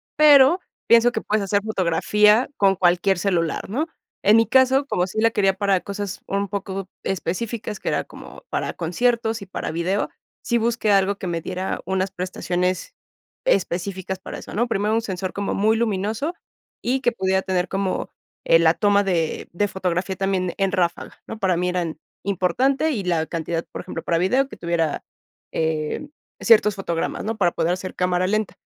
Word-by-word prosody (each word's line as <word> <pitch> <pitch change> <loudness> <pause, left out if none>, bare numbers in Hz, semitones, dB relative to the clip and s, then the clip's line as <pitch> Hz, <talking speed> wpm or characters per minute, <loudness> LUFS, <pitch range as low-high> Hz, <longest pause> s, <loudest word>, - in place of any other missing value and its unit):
Pero, 300 +3 +7 0.3
pienso 235 +1 +6
que - - -2
puedes 210 -1 -1
hacer 200 +1 +1
fotografía 210 +4 +3
con 195 -1 +3
cualquier 180 +1 +3
celular, 175 -4 -1
¿no? 290 +10 -1 0.4
En 210 +3 +7
mi 225 - +5
caso, 265 +1 +4
como 180 -10 0
sí 195 +3 -4
la 230 +1 +4
quería 195 -3 +2
para 195 -1 +1
cosas 200 -1 -5
un 200 +1 -1
poco 195 -1 -4 0.2
específicas, 210 +4 -3
que - - -2
era - - 0
como - - -13
para - - -2
conciertos 225 +6 0
y - - -7
para 185 - -4
video, 175 +5 0 0.3
sí 235 - 0
busqué 230 -2 +1
algo 195 +1 +3
que 185 - -5
me 170 -1 -2
diera 185 +3 -3
unas 190 +1 0
prestaciones 180 -1 -2 0.5
específicas 190 - -1
para - - -7
eso, - - -10
¿no? 235 +5 +1
Primero, 210 0 0
un 225 - +2
sensor 190 -3 -4
como 200 0 -2
muy 215 +2 +2
luminoso 220 - -1 0.5
y 260 +2 0
que 240 - +2
pudiera 190 -4 0
tener 185 -1 -1
como, 195 -1 -2 0.4
eh, 165 - +6
la 165 0 +4
toma 205 -1 +3
de 170 -5 -1
de 205 +4 0
fotografía 185 0 -2
también 185 -2 -1
en 195 -1 +1
ráfaga, 175 -3 -2
¿no? 225 - -6
Para 190 -4 +1
mí 180 +1 0
eran 175 -3 -2 0.2
importante 245 - +1
y 220 -9 -2
la 170 -3 0
cantidad, 165 0 -3
por - - -5
ejemplo, 165 - -6
para 165 - +1
video 255 +10 +2
que - - -10
tuviera, 170 -3 -1 0.5
eh, 160 - -2 0.3
ciertos 210 -3 +5
fotogramas, 170 -1 -3
¿no? 220 0 -2
Para 175 -4 +3
poder 170 +1 0
hacer 185 +1 -5
cámara 180 0 +1
lenta. 215 +1 0
195 Hz, 180 wpm, -22 LUFS, 180-220 Hz, 0.5 s, Pero